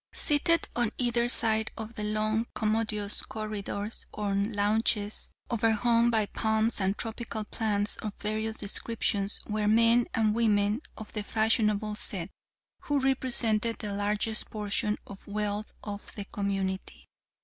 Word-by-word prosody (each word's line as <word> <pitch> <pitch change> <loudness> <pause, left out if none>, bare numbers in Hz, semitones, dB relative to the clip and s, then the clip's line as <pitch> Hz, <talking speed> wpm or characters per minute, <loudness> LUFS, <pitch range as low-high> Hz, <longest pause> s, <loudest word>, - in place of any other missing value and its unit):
Seated 335 +2 +2
on 240 -2 +2
either 240 -1 +1
side 220 -2 +2
of 220 +1 -7
the 210 - -5
long, 215 +2 0
commodious 215 -2 0
corridors, 215 0 -5
on 200 0 -1
lounges 210 0 0 0.2
overhung 230 +1 +3
by 220 -2 +3
palms 220 +1 0
and 190 +1 0
tropical 225 -1 -4
plants 210 -1 -1
of 215 - -4
various 220 +1 -2
descriptions, 205 -1 0
were 210 -1 -1
men 230 +2 +4
and 220 -1 +2
women 210 0 +2 0.2
of 220 - -9
the 210 - -3
fashionable 215 -1 +1
set, 195 -3 -3 0.5
who 290 - -1
represented 240 -4 +5
the 205 -2 -5
largest 210 +2 -1
portion 210 0 -1
of 200 -1 -12
wealth 210 0 -3
of 205 -1 -7
the 205 - -6
community. 195 -2 -3
215 Hz, 130 wpm, -28 LUFS, 205-225 Hz, 0.5 s, represented